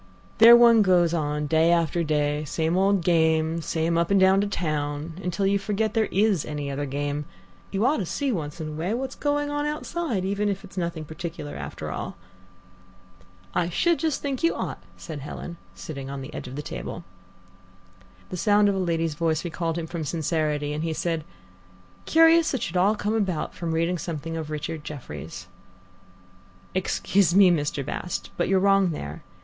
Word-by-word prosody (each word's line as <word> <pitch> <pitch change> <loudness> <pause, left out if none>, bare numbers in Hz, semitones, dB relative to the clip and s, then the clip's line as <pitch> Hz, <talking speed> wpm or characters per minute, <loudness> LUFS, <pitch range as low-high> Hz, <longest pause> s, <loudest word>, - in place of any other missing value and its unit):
There 230 +1 +10
one 235 -2 +7
goes 175 -4 +4
on 150 -2 -1
day 160 +2 +3
after 170 0 +2
day, 150 -1 0
same 160 +3 -1
old 195 -1 +3
game, 160 -1 +2
same 165 +1 0
up 170 - +1
and 200 -1 +4
down 190 +1 +5
to 205 - 0
town, 155 -2 -3
until 180 +2 -1
you 200 +1 +2
forget 210 +2 -1
there 220 -2 +1
is 200 -4 +2
any 145 -2 -4
other 145 +1 -3
game. 145 +2 -2 0.4
You 200 +3 0
ought 290 +4 +3
to 190 - -2
see 280 - -1
once 155 -7 -4
in 155 -1 -4
a - - -6
way 165 +8 -2
what's 265 +2 -3
going 290 0 -1
on 290 0 -1
outside, 300 - -2
if 200 +1 -2 0.2
it's 200 - -13
only 180 -2 0
nothing 165 -2 -6
particular 160 -1 -6
after - - -6
all." - - -5 1.4
"I 170 -1 +1
should 340 - +2
just 315 -4 -1
think 275 -3 -2
you 335 - +2
ought," - - -4 0.2
said 155 -4 -7
Helen, 170 +4 -7 0.2
sitting 135 -3 -7
on 140 -1 -5
the 135 +3 -8
edge - - -6
of 125 - -8
the 150 - -4
table. - - -6 1.3
The 180 - -5
sound 205 +2 +4
of - - +1
a 195 - -1
lady's 165 -3 0
voice 160 +1 0
recalled 165 -1 -2
him 170 - -3
from 165 0 -5
sincerity, 150 -1 -1
and 150 +1 -3
he 165 -1 -1
said: 165 -1 -2 0.8
"Curious 325 -1 +5
it 250 - -2
should 165 - -4
all 195 +4 +4
come 210 0 -1
about 195 -8 -1
from 170 -1 -4
reading 165 +2 0
something 165 0 -4
of 160 -2 -4
Richard 150 0 -4
Jefferies." 90 - -8 1.3
"Excuse 185 0 +1
me, 195 -2 +7
Mr. 145 -4 -1
Bast, 180 +4 -4
but 175 - 0
you're 190 0 +3
wrong 195 -1 +4
there. 75 - -6
170 Hz, 185 wpm, -25 LUFS, 155-200 Hz, 1.4 s, There